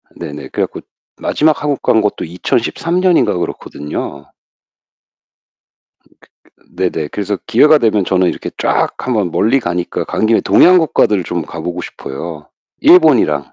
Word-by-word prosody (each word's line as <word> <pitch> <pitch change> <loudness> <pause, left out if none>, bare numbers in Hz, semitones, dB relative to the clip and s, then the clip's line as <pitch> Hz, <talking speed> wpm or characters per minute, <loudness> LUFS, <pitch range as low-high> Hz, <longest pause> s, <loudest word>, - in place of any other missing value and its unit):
네네. 75 0 -8
그래 - - -1
갖고 - - -10 0.4
마지막 155 0 +1
한국 145 -2 -1
간 110 - +3
것도 105 -1 -2
2013 165 - -2
년인가 185 -2 +3
그렇거든요. 75 -3 -6 1.8
음 - - -30 0.3
그 - - -28
그 - - -31
네네. 85 -5 -2
그래서 100 +3 -3
기회가 150 +6 +5
되면 110 -6 +1
저는 90 -1 +1
이렇게 - - -5
쫙 - - +1
한번 110 -8 -1
멀리 120 +10 +2
가니까 90 -3 -3
간 110 - -1
김에 115 - +3
동양 180 +1 +5
국가들 110 - +1
좀 85 0 -3
가 85 - -8
보고 90 +2 -4
싶어요 75 +2 -8 0.3
일본이랑. 120 - +4
100 Hz, 295 characters per minute, -15 LUFS, 85-140 Hz, 1.8 s, 기회가